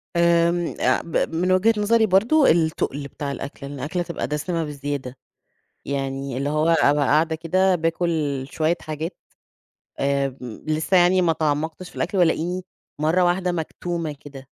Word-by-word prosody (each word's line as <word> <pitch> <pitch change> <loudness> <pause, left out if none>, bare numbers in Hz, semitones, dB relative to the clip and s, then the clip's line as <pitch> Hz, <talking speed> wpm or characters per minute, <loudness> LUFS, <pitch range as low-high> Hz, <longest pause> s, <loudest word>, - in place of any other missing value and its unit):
آمم، 170 0 +2
آآ، - - +2
ب 165 - -3 0.2
من 180 +2 +1
وجهة 195 +5 +4
نظري 220 +2 +3
برضه 225 +10 +4
التقل 160 -4 0
بتاع 140 0 -5
الأكل، 140 0 -7
إن 140 - -7
الأكلة 155 +7 -3
تبقى 170 - -4
دسمة 165 +3 -2
بزيادة. 140 -3 -5 0.7
يعني 135 -1 -3
اللي 140 +2 -1
هو 155 +2 +1
أبقى 145 -3 +4
قاعدة 160 +3 +2
كده 185 +3 +2
باكل 165 -4 -1
شوية 160 +2 +1
حاجات، 155 +3 -5 0.8
آمم، 135 -4 -2
لسه 155 +4 +1
يعني 180 +1 +5
ما 165 - +3
تعمقتش 160 +3 -2
في - - -19
الأكل 200 - -1
والاقيني 175 +1 +1 0.4
مرة 165 +4 +2
واحدة 180 +1 +1
مكتومة 170 -1 -3
كده. 135 -2 -11
160 Hz, 150 wpm, -23 LUFS, 145-175 Hz, 0.8 s, يعني